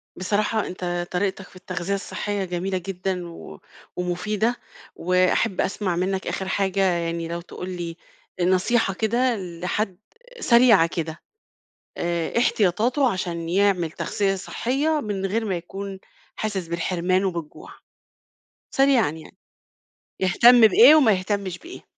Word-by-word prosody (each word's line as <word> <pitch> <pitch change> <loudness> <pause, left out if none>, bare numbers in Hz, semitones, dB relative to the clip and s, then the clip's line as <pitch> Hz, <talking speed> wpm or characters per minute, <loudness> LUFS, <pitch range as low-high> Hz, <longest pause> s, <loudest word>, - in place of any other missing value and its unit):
بصراحة 210 +3 0
أنت 175 -1 -4
طريقتك 190 +1 -2
في - - -21
التغذية 185 0 -4
الصحية 200 0 -3
جميلة 185 +2 -2
جدًا 180 -1 -4
و 170 - -11 0.4
ومفيدة، 210 +6 -1 0.4
وأحب 185 +3 +1
أسمع 190 -2 -1
منك 190 +2 -2
آخر 190 - -3
حاجة 195 0 0
يعني 170 -3 0
لو 170 +1 -4
تقول 180 +1 -8
لي، 175 -2 -5 0.4
نصيحة 190 +4 +2
كده 235 +5 +1
لحد 180 +1 -3 0.4
سريعة 235 - +5
كده. 165 -1 -5 0.8
آآ 170 -1 -1
إيه - - -4
احتياطاته، 235 +4 +2
عشان 170 -3 -4
يعمل 185 -3 +2
تغذية 195 +3 -1
صحية، 275 +10 -1
من 200 -4 -3
غير 220 +4 -1
ما 195 -3 -1
يكون 195 +3 -7 0.4
حاسس 200 -5 -3
بالحرمان 180 +2 0
وبالجوع؟ 170 -5 -5 1.0
سريعًا 270 - +3
يعني. 160 +4 -12 0.8
يهتم 240 +6 +6
بإيه 370 - +8
وما 270 -8 +5
يهتمش 190 -1 -2
بإيه؟ 350 - -11
190 Hz, 125 wpm, -23 LUFS, 175-210 Hz, 1.0 s, بإيه